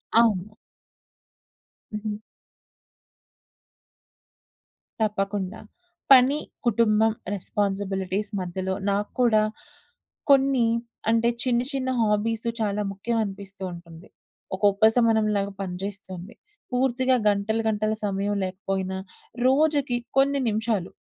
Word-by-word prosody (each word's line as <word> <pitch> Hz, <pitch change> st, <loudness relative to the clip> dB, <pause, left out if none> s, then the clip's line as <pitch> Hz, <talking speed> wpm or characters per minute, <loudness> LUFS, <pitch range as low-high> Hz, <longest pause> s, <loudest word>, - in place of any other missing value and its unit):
అవును. 215 Hz, -3 st, +3 dB, 1.4 s
హుహు. 210 Hz, 0 st, -3 dB, 2.8 s
తప్పకుండా. 200 Hz, -1 st, -1 dB, 0.5 s
పని, 270 Hz, +2 st, +7 dB, 0.3 s
కుటుంబం, 220 Hz, -1 st, +3 dB, 0.2 s
రెస్పాన్సిబిలిటీస్ 195 Hz, 0 st, -2 dB
మధ్యలో 185 Hz, +1 st, -3 dB, 0.2 s
నాకు 205 Hz, +1 st, -1 dB
కూడా 220 Hz, -3 st, +4 dB, 0.9 s
కొన్ని 270 Hz, -3 st, +5 dB, 0.4 s
అంటే 230 Hz, +1 st, +3 dB
చిన్న, 245 Hz, -2 st, +2 dB
చిన్న 260 Hz, -1 st, -1 dB
హాబీసు 220 Hz, +2 st, +1 dB
చాలా 210 Hz, -1 st, 0 dB
ముఖ్యమనిపిస్తూ 200 Hz, -2 st, -3 dB
ఉంటుంది. 170 Hz, 0 st, -12 dB, 0.5 s
ఒక 190 Hz, -, -12 dB
ఉపసమనంలాగా, 220 Hz, -2 st, +3 dB
పని 185 Hz, -2 st, -4 dB
జేస్తుంది. 195 Hz, -1 st, -6 dB, 0.4 s
పూర్తిగా 255 Hz, 0 st, +2 dB
గంటలు 205 Hz, +2 st, 0 dB
గంటల 215 Hz, 0 st, 0 dB
సమయం 200 Hz, +1 st, -1 dB
లేకపోయినా, 190 Hz, 0 st, -3 dB, 0.5 s
రోజుకి 285 Hz, -2 st, +2 dB, 0.2 s
కొన్ని 280 Hz, +1 st, +4 dB
నిమిషాలు 215 Hz, -3 st, -1 dB
210 Hz, 85 wpm, -25 LUFS, 195-235 Hz, 2.8 s, పని